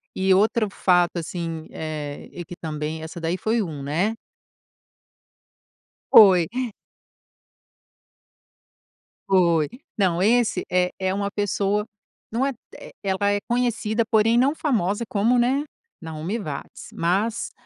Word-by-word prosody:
E 190 0 +3
outro 215 +2 +2
fato, 180 -2 +2
assim, 165 -1 -5
eh, 150 -2 -6
e 175 - -8
que 175 - -9
também 155 -1 -4
essa 160 +2 -7
daí 165 +2 -1
foi 220 +4 0
um, 155 -8 -5
né? 175 +10 0 2.0
Foi. 185 -6 +8 2.8
Foi. 170 -5 +3 0.3
Não, 180 -4 +2
esse 220 -2 +2
é 180 0 +2
é 190 0 0
uma 200 0 -2
pessoa 205 0 0 0.5
não 240 +4 +1
é 275 - -1 0.2
eh, - - -11
ela 200 +1 +1
é 205 - +1
conhecida, 235 -2 0
porém 225 +1 +3
não 265 +4 +3
famosa 230 - 0
como, 225 +4 +2
né, 260 +4 +2 0.4
Naomi 160 +5 -4
Watts. 155 -11 -7
Mas 200 +7 -1
190 Hz, 120 wpm, -23 LUFS, 170-220 Hz, 2.8 s, Foi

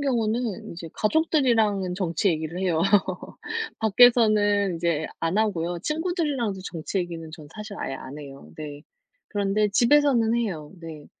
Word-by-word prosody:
경우는 235 -5 -1
이제 170 0 -8
가족들이랑은 220 - +2
정치 180 0 0
얘기를 160 +1 -2
해요. 175 -4 +1 1.0
밖에서는 215 -3 +4
인제 165 -2 0
안 165 +4 0
하고요. 175 -5 0
친구들이랑도 305 - -1
정치 170 +2 -5
얘기는 165 -3 -5
전 155 -3 -10
사실 210 -1 -7
아예 - - -3
안 135 +2 -8
해요. 140 -2 -11
네. 145 -2 -7 0.5
그런데 205 +1 +1
집에서는 240 -1 +4
해요, 185 -11 -2
네. 160 -3 -9
200 Hz, 310 characters per minute, -25 LUFS, 165-230 Hz, 1.0 s, 밖에서는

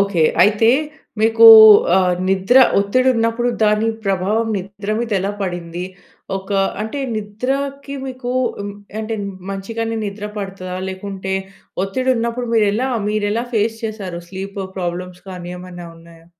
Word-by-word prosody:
Okay. 200 -4 +1 0.2
అయితే 210 +3 +3 0.5
మీకు 225 +1 +6 0.5
ఆహ్, 185 -1 +3 0.2
నిద్ర 195 +6 +2 0.2
ఒత్తిడి 230 +6 +2
ఉన్నప్పుడు, 230 +1 0
దాని 210 +1 +3 0.2
ప్రభావం 200 +4 0
నిద్ర 200 +2 -6
మీద 235 0 -3
ఎలా 195 +2 -1
పడింది. 175 -2 -4 0.5
ఒక 195 +1 -9 0.3
అంటే, 220 +6 -4 0.2
నిద్రకి 270 +7 -4
మీకు 255 -1 -5 0.3
హ్మ్, 200 0 -5 0.3
అంటే 220 +1 -3 0.4
మంచిగానే 225 +4 -4
నిద్ర 205 +1 -6
పడతాద? 190 -2 -6
లేకుంటే 190 0 -5 0.5
ఒత్తిడి 255 +7 -1
ఉన్నప్పుడు 235 +1 -2
మీరు 220 -2 +4
ఎలా, 250 +5 -1 0.2
మీరు 210 -1 0
ఎలా 230 +2 -1
ఫేస్ 220 +1 +1
చేసారు? 195 -6 -5
స్లీప్ 195 +2 -6 0.2
ప్రాబ్లమ్స్ 180 0 -5
కానీ 175 -1 -7
ఏమైనా 180 -1 -9
ఉన్నాయా? 165 0 -17
205 Hz, 130 wpm, -19 LUFS, 190-225 Hz, 0.5 s, మీకు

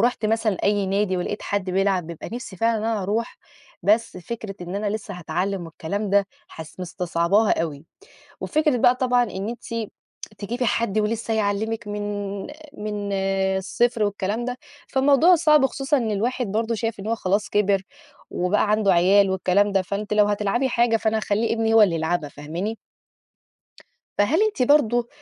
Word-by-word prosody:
رُحت 235 -2 +1
مثلًا 220 -3 +1
أي 205 -1 +2
نادي 195 0 0
ولقيت 180 +4 -3
حد 200 -2 -2
بيلعب 190 -2 +1
بيبقى 170 -2 -8
نِفسي 235 -6 -7
فعلًا 225 +2 +1
إن 215 - -4
أنا 225 -3 -1
أروح 215 +5 -2 0.4
بس 220 +1 +2
فكرة 205 +2 -6
إن 175 +1 -6
أنا 205 0 -1
لسّه 215 -2 -5
هاتعلّم 180 +2 -3
والكلام 195 +5 -4
ده 200 0 +3 0.2
حس 160 +3 -10
مِستصعَبَاها 180 +4 +1
أوي. 150 -1 -6 0.6
وفكرة 305 -4 +1
بقى 245 +2 +4
طبعًا 250 -1 +2
إن 205 -2 -4
أنتِ 230 -2 -5 0.5
تجيبي 240 +5 -3
حد 220 -3 0
ولسّه 225 +1 -1
هيعلِّمِك 220 +1 -1
من 205 -1 -4 0.3
من 210 -1 -4 0.5
الصفر 225 +3 0
والكلام 205 +3 -2
ده، 250 0 -4 0.3
فالموضوع 285 +6 +5
صعب 300 -4 +4
خصوصًا 275 +2 0
إن 230 -4 -1
الواحد 240 +4 -1
برضه 225 +3 -1
شايف 225 -1 -3
إن 195 - -6
هو 230 - +1
خلاص 200 0 -1
كِبِر 200 -2 +2 0.5
وبقى 205 +4 +1
عنده 210 -3 +3
عيال 190 +3 +4
والكلام 190 +2 +2
ده. 195 -1 +2
فأنتِ 205 +3 -4
لو 210 0 +5
هتلعبي 210 +5 0
حاجة، 235 -2 +2
فأنا 220 0 0
هاخلّي 220 +1 0
ابني 225 0 +1
هو 225 - +7
اللي 180 -5 +4
يلعبها 160 -1 -1
فاهماني؟ 165 +10 -5 1.4
فهل 285 - +3
أنتِ 430 -12 +1
برضه 240 -4 +3
210 Hz, 160 wpm, -23 LUFS, 195-230 Hz, 1.4 s, هو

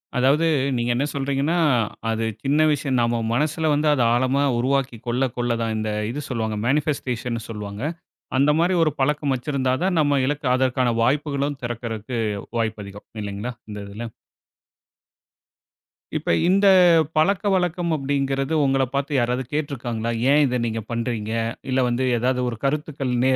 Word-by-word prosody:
அதாவது 135 +6 +3 0.3
நீங்க 120 0 -1
என்ன 135 +4 +1
சொல்றீங்கனா, 140 +4 0 0.5
அது 115 0 0 0.2
சின்ன 140 +3 +2
விஷயம் 135 -3 0
நம்ம 120 0 +1 0.2
மனசில 155 +4 +1
வந்து 150 +1 +1
அத 130 - +1
ஆழமா 130 +3 +2
உருவாக்கி 130 0 0
கொள்ள 125 +3 +1
கொள்ள 120 0 0
தான் 115 -1 -1
இந்த 110 0 -2 0.2
இது 145 - -4
சொல்வாங்க, 110 -3 -2
மேனிஃபஸ்டேஷண்ணு 125 -4 -1
சொல்வாங்க. 105 -1 -6 0.6
அந்த 140 +2 +4
மாரி 175 +3 +3
ஒரு 155 - +2
பழக்கம் 145 0 +1
வைச்சிருந்தா 130 0 -1
தான் 185 -2 +1
நம்ம 145 -1 +3
இலக்கு, 145 +2 -2
அதற்கான 130 -2 +1
வாய்ப்புகளும் 140 +2 0
திறக்கறதுக்கு 115 0 -4 0.4
வாய்ப்பு 110 -2 -2
அதிகம் 100 +1 -11
இல்லைங்களா, 105 +4 -4 0.2
இந்த 105 -1 -6
இதில. 110 +4 -6 2.1
இப்ப - - 0 0.2
இந்த 195 +2 +3 0.5
பழக்கவழக்கம் 180 -1 +1
அப்படின்கிறது, 135 0 -1
உங்களை 135 -1 +2
பார்த்து 140 0 0
யாராவது 125 +1 0
கேட்டு 150 -1 -1
இருக்காங்களா? 115 -2 -3 0.2
ஏன் 150 +1 +5
இதை 125 -2 0
நீங்க 115 -1 -2
பண்ணுறீங்க? 115 -2 -2 0.4
இல்ல 130 0 +1
வந்து 120 +2 0
ஏதாவது 125 +2 0
ஒரு 115 - -6
கருத்துக்கள் 140 -2 -1
நேய 130 0 +4
130 Hz, 145 wpm, -23 LUFS, 120-145 Hz, 2.1 s, ஏன்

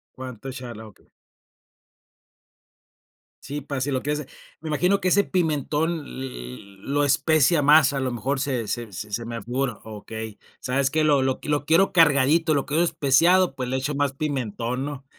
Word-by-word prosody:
Cuánto 130 -1 -8
echarle, 120 -4 -7
ah, - - -10
okey. 105 - -21 2.4
Sí, 145 +2 -4
para 140 -1 -4
si 140 - -1
lo 130 -2 0
quieres 150 0 -2 0.4
me 160 - -5
imagino 180 +7 +1
que 185 - +2
ese 200 - +5
pimentón 160 -2 -1
l 135 -2 -7 0.3
l - - -10 0.2
lo 145 +6 0
especia 155 +3 +3
más, 145 0 +5
a 140 - -2
lo 130 -1 -1
mejor 130 +4 -2
se 130 -5 -2
se 120 -2 -4
se 105 +4 -5
me 115 -2 -5
figura, 125 0 -3
okey, 110 0 -8 0.2
¿sabes 135 +1 0
qué? 155 +2 +1
Lo 145 -2 +4
lo 130 0 -1
lo 145 -1 -1
quiero 170 +5 +4
cargadito, 155 0 +4
lo 140 - 0
quiero 155 +3 +1
especiado, 170 +2 +3
pues 130 -2 -4
le 130 - -1
echo 135 +3 -2
más 140 -1 0
pimentón, 130 -3 -3
¿no? 140 -2 -7
140 Hz, 175 wpm, -24 LUFS, 125-150 Hz, 2.4 s, ese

